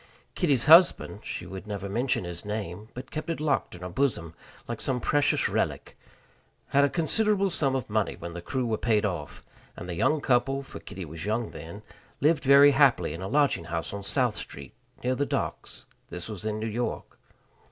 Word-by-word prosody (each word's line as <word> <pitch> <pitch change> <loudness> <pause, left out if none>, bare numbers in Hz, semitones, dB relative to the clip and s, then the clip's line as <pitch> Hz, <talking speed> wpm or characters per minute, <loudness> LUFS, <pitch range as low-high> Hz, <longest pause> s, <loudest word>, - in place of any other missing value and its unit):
Kitty's 145 - +2
husband 170 +3 +6
she - - -5
would 95 +2 -8
never 100 -2 -4
mention 120 +3 0
his 85 -1 -6
name, 105 -1 -5
but 125 +2 -8
kept 155 +1 -5
it 165 - -2
locked 140 -11 0
in 90 - -12
her 90 - -4
bosom 90 - -1 0.3
like - - -5
some 130 -2 0
precious 145 +4 +2
relic - - -2 0.7
had 140 +1 +4
a 140 - +4
considerable 200 +5 +1
sum 135 -5 0
of 130 - -2
money 110 -1 0
when 85 0 -8
the 85 - -6
crew 130 +7 -2
were 110 -2 -1
paid 110 -2 +2
off; 85 -8 -4 0.3
and 90 - -7
the 90 - -4
young 150 - +2
couple 135 +1 +1
for - - -10
Kitty 95 - -8
was 80 +2 -7
young 110 +1 -1
then 85 +6 -9 0.4
lived 155 +1 +3
very 140 +1 +8
happily 135 - +3
in 85 - -7
a 95 - -4
lodging 140 - +2
house 85 +1 -4
on 100 - -4
South 120 +3 +1
Street, 70 -2 -9 0.3
near 125 +1 +1
the 140 - 0
docks. - - -4 0.2
This 90 0 -6
was 105 -2 -7
in 110 -1 -1
New 110 - -3
York. 115 +2 -4
115 Hz, 195 wpm, -27 LUFS, 95-140 Hz, 0.7 s, very